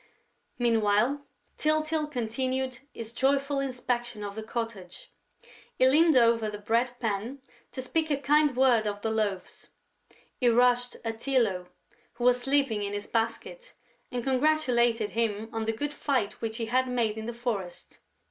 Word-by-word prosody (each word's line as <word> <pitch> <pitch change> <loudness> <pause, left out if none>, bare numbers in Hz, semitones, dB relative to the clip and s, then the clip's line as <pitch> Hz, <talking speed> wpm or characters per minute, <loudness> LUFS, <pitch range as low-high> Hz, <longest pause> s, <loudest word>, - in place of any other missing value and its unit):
Meanwhile, 235 +4 +2 0.3
Tyltyl 310 0 +1
continued 255 0 -2
his 230 0 -8
joyful 275 +2 +1
inspection 245 -4 -2
of 200 -1 -5
the 220 - -6
cottage. 220 -5 -6 0.7
He 255 - +5
leaned 310 +2 +5
over 230 -2 +4
the 210 - -6
bread 230 +4 0
pan 225 +4 -3 0.3
to 260 - -5
speak 315 +4 -1
a 285 - +1
kind 295 0 +3
word 250 -4 +4
to 205 -1 -2
the 220 +1 -2
Loaves; 210 -4 -3 0.7
he 245 - +2
rushed 245 +1 +3
at 225 0 -3
Tylô, 225 -10 0 0.5
who 240 - -7
was 250 0 +4
sleeping 270 -4 +1
in 200 0 -3
his 205 0 -4
basket, 235 - -3 0.4
and 245 -2 -3
congratulated 250 -5 +2
him 220 -1 -1
on 225 -1 -2
the 225 - +1
good 290 +6 -3
fight 255 -8 -1
which 225 0 -3
he 230 - -2
had 255 +3 +1
made 235 -4 0
in 220 0 -6
the - - -2
forest. 225 -7 -5
240 Hz, 155 wpm, -28 LUFS, 220-265 Hz, 0.7 s, He